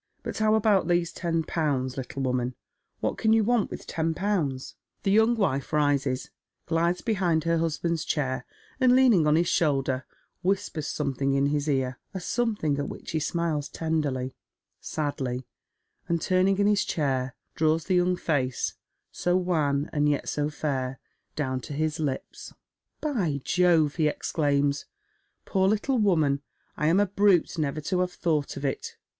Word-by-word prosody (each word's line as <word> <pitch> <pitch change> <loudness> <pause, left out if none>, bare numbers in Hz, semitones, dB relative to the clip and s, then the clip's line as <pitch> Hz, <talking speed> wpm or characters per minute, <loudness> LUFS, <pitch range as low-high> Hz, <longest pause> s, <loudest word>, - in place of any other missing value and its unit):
But - - -4
how 215 0 +4
about 205 -5 +3
these 175 -1 +1
ten 165 -2 -1
pounds, 140 -6 -1
little 135 +1 -4
woman? 125 -1 -1 0.5
What - - -1
can 220 -1 +3
you 225 -1 +4
want 235 -1 +2
with - - -7
ten 160 0 -1
pounds? 165 -10 -1 0.2
" - - -47
The 195 - +2
young 220 +3 +4
wifa 140 -9 0
rises, 140 -3 +1 0.3
glides 170 +2 +1
behind 180 -8 +1
her 165 0 +1
husband's 165 0 -1
chair, 130 -4 -1 0.4
and, 255 -1 +5
leaning 235 -12 +5
on 150 - +4
his 170 +2 +2
shoulder, 135 -6 +1 0.3
whispers 180 -5 -1
something 140 -2 -1
in 140 0 +3
his 145 +1 0
ear, 130 -2 0 0.2
a - - -2
some 230 +4 0
thing 150 -7 -1
at 140 - -2
which - - -8
he 160 - 0
smiles 155 -2 -1
tenderly, 145 -6 -1 0.5
sadly, 130 -4 -3 0.6
and, 170 0 +2
turning 185 +3 +2
in 200 - +3
his 205 -1 +3
chair, 135 -4 -1 0.2
draws 160 0 +1
the 185 -2 +3
yoimg 180 0 +1
face 130 -7 -1 0.2
— - - -54
so 180 +1 +1
wan 155 -5 +1
and 150 -1 +2
yet 145 - -1
so 150 0 -1
fair 135 -3 -3 0.2
— - - -49
down 130 -4 -1
to 145 - -7
his 155 +2 -1
lips. 145 -4 -4 0.2
" - - -53
By 195 - 0
Jove! 170 -5 +3
" - - -17
he 155 -2 +3
exclaims, 145 -2 0 0.3
" - - -46
poor 190 -1 +2
little 230 +5 +1
woman, 155 -9 +2 0.3
I 150 - 0
am 170 +5 +4
a 205 - +4
brute, 195 -3 +2
never 155 0 -1
to 180 +5 -1
have 180 0 0
thought 155 -7 -1
of 140 - -4
it. 135 - -3
155 Hz, 175 wpm, -27 LUFS, 140-180 Hz, 0.6 s, and